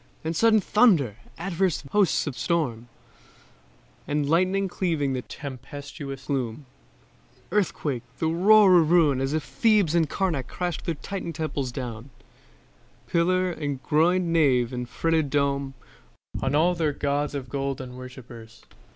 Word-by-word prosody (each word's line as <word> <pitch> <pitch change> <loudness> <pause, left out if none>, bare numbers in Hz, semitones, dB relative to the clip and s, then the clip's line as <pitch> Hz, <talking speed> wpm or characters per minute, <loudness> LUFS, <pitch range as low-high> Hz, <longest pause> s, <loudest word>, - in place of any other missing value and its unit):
Then 160 +1 -2
sudden 220 +5 +4
thunder; 180 - +3 0.2
adverse 180 -2 -1
hosts 200 -5 +2
of 145 -4 -4
storm; 125 -10 -1 1.2
And 145 -1 0
lightning 185 +5 +2
cleaving 160 -7 -1
the 130 - -2
tempestuous 140 +1 -8
gloom; 130 -1 -3 0.9
Earthquake, 160 - -1 0.2
and 165 +2 -1
roar 210 -4 +8
of 160 -2 +2
ruin 155 -6 +4
as 135 +2 -1
if 155 -1 -1
Thebes 210 -8 +2
And 165 -3 +2
Karnac 160 -10 -1
crashed 175 +3 -4
their 170 -3 -1
Titan 175 +2 -5
temples 145 -5 -3
down, 120 -1 -6 1.0
Pillar 185 +2 +1
and 145 -5 -4
groinéd 165 +4 +3
nave 140 -8 +2
and 125 -1 -4
fretted 160 -3 0
dome, 140 -1 0 0.7
On 135 +2 0
all 170 +4 +3
their 160 -4 0
gods 145 +1 -1
of 135 -2 -5
gold 135 +1 -3
and 125 -1 -8
worshippers. 120 -3 -11
150 Hz, 135 wpm, -25 LUFS, 135-175 Hz, 1.2 s, roar